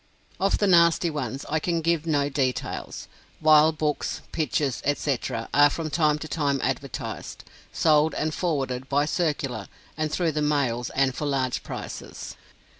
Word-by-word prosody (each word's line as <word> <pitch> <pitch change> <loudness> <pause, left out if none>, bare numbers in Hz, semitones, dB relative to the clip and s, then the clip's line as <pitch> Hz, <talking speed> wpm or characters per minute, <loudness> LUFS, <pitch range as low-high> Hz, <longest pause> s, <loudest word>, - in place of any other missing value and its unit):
Of 195 +1 +2
the 205 - +1
nasty 170 -2 +4
ones, 135 -3 -4
I 160 - 0
can 170 +1 -1
give 165 0 0
no 145 -3 +2
details. 130 -2 -3 0.3
Vile 155 0 +6
books, 155 -2 -2
pictures, 145 -4 -1
etc., 135 -5 -1
are 145 +1 +6
from 155 +1 -4
time 150 -1 +2
to 155 - -7
time 140 -1 0
advertised, - - -4 0.3
sold, 155 0 +3
and 155 0 -1
forwarded, 135 -7 -2
by 145 +1 +2
circular, 145 - -1 0.3
and 155 -1 -2
through 170 -1 +1
the 150 0 -2
mails, 140 -5 0
and 135 -1 +2
for 150 - -3
large 130 -3 0
prices. - - -7
150 Hz, 150 wpm, -25 LUFS, 135-160 Hz, 0.3 s, Vile